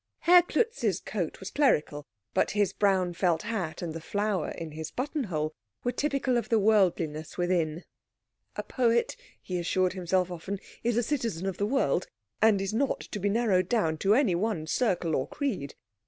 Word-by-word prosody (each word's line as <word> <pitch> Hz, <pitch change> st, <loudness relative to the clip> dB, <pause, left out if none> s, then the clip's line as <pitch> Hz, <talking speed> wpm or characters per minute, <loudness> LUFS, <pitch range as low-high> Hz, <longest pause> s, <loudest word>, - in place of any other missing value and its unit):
Herr 355 Hz, +1 st, +7 dB
Klutz's 350 Hz, -, 0 dB
coat 180 Hz, -7 st, -4 dB
was 190 Hz, -, -7 dB
clerical, 150 Hz, -, +1 dB, 0.3 s
but -, -, +2 dB
his 200 Hz, -2 st, +2 dB
brown 190 Hz, -3 st, +2 dB
felt 170 Hz, -2 st, +1 dB
hat 195 Hz, -8 st, -3 dB
and 165 Hz, -2 st, -3 dB
the 165 Hz, -, -6 dB
flower 205 Hz, +2 st, -1 dB
in 165 Hz, -2 st, -6 dB
his 155 Hz, +1 st, -6 dB
buttonhole 195 Hz, -, -2 dB, 0.3 s
were 245 Hz, -, +1 dB
typical 275 Hz, -1 st, 0 dB
of 235 Hz, -, -2 dB
the 230 Hz, -, +4 dB
worldliness 175 Hz, -7 st, +1 dB
within. 175 Hz, -2 st, 0 dB, 0.7 s
"A -, -, -3 dB
poet," 235 Hz, -2 st, +1 dB, 0.2 s
he 180 Hz, -1 st, -4 dB
assured 180 Hz, +1 st, +1 dB
himself 185 Hz, 0 st, 0 dB
often, 180 Hz, +4 st, -4 dB, 0.3 s
"is 235 Hz, -1 st, +1 dB
a 240 Hz, -, +3 dB
citizen 230 Hz, -, -2 dB
of 195 Hz, -2 st, -2 dB
the 205 Hz, -, 0 dB
world, 210 Hz, -, +1 dB, 0.3 s
and 215 Hz, -3 st, +5 dB
is 195 Hz, -, -3 dB
not 270 Hz, +4 st, 0 dB
to 210 Hz, -, -6 dB
be 205 Hz, +1 st, 0 dB
narrowed 200 Hz, -5 st, +2 dB
down 160 Hz, -10 st, +1 dB
to 200 Hz, +2 st, +4 dB
any 250 Hz, -8 st, +3 dB
one 180 Hz, -3 st, -1 dB
circle 175 Hz, -, 0 dB
or 130 Hz, -, -1 dB
creed." 205 Hz, -, -3 dB
195 Hz, 175 wpm, -28 LUFS, 170-230 Hz, 0.7 s, Herr